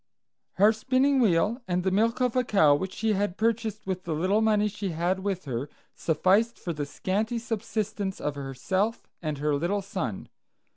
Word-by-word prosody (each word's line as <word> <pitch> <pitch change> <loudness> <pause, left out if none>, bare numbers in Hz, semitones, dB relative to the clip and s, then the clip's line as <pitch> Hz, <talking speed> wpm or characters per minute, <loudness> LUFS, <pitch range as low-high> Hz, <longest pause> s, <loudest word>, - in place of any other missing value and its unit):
Her 205 +3 +5
spinning 265 +4 +2
wheel 215 +3 +2
and 180 0 0
the 190 - +1
milk 225 +6 +2
of 250 -1 +1
a 255 - +3
cow 175 -11 +4
which 190 +6 -1
she 220 -1 +1
had 200 -1 -1
purchased 220 -1 -1
with 190 -1 -3
the 165 -2 -2
little 190 +7 +2
money 210 -1 +3
she 205 -1 -4
had 175 +3 0
with 190 -2 -3
her, 130 +1 -3 0.2
sufficed 190 +8 +2
for 170 - -4
the 145 -2 -4
scanty 210 +9 -1
subsistence 215 -3 -3
of 150 - -2
herself 145 - -2 0.2
and 155 -3 -3
her 150 +1 0
little 175 +8 0
son. 155 - -4
195 Hz, 180 wpm, -27 LUFS, 170-220 Hz, 0.2 s, Her